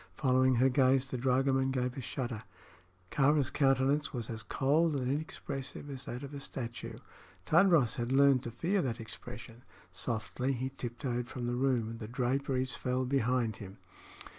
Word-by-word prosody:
Following 130 -1 +3
her 130 +3 +4
gaze, 130 0 +3
the - - -2
dragoman 130 +1 +2
gave 125 -1 -1
a 135 - -5
shudder. 120 -3 -4 0.7
Kāra's 145 -1 +3
countenance 135 +1 +2
was 120 -3 -4
as 110 0 -5
cold 150 +6 +2
and 130 -1 0
inexpressive 145 -1 -5
as 135 -1 -5
that 125 +3 -6
of 140 +1 -8
a 140 - -5
statue. 120 -4 -6 0.5
Tadros 165 - +4
had 120 0 -2
learned 135 -1 +5
to 120 - -5
fear 180 - 0
that 125 -5 -2
expression. 115 +1 -9 0.3
Softly 115 +6 -2
he 130 +1 -2
tiptoed 120 -1 -4
from 125 -1 -5
the 120 - -1
room, 125 -3 +1
and 115 0 -7
the 110 - -6
draperies 130 +2 0
fell 130 0 -1
behind 125 -4 +1
him. 95 -1 -10
130 Hz, 165 wpm, -32 LUFS, 120-135 Hz, 0.7 s, learned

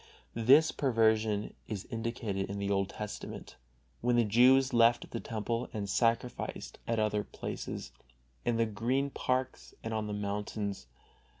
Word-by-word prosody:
This 135 +7 +5
perversion 110 -5 +2
is 105 -3 -4
indicated 115 -4 -2
in 100 - -4
the 100 0 -1
Old 100 -1 +1
Testament, 105 0 -7 0.4
when 120 0 +2
the 120 - +5
Jews 130 +5 +5
left 120 0 +4
the 115 - -3
Temple 115 +2 -3
and 105 -2 -3
sacrificed 115 +4 -1
at 115 - 0
other 105 -1 +1
places, - - -6 0.5
in 120 -1 +1
the 115 - +3
green 120 +6 0
parks 130 0 -2
and 115 - -3
on 110 -1 -1
the 105 - -3
mountains. 100 - -3
115 Hz, 140 wpm, -31 LUFS, 105-120 Hz, 0.5 s, This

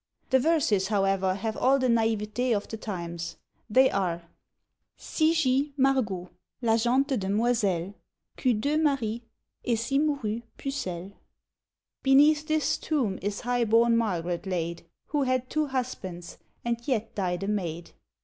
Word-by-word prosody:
The 260 - +5
verses 250 - +2
however 195 -2 +1
have 220 +2 -3
all 270 +2 +3
the 260 - 0
naïveté 225 0 +1
of 205 - -6
the - - -5
times. 170 -5 -5 0.3
They 260 +5 +5
are 175 -3 -1 0.7
Cy 315 0 +1
gist 280 -2 +1
Margot, 235 -10 +1 0.3
la 230 -3 +2
gente 260 +4 +2
demoiselle, 200 -3 0 0.4
Qu'eut 245 -6 +1
deux 285 +7 +1
maris, 240 -7 0 0.4
et 235 -2 +1
si 240 +5 0
mourut 275 -7 -1 0.2
pucelle. 195 -9 -4 0.9
Beneath 295 +3 +5
this 310 -1 +1
tomb 245 -12 -1
is 200 0 -3
high 245 0 +1
born 230 +1 +4
Margaret 180 -5 -1
laid, 170 -2 -3 0.2
Who 295 -1 0
had 255 -1 0
two 310 -1 +1
husbands, 200 -10 -5 0.3
and 235 -1 0
yet 230 -5 -1
died 180 -2 -2
a - - -2
maid. 175 -5 -3
230 Hz, 140 wpm, -27 LUFS, 195-265 Hz, 0.9 s, The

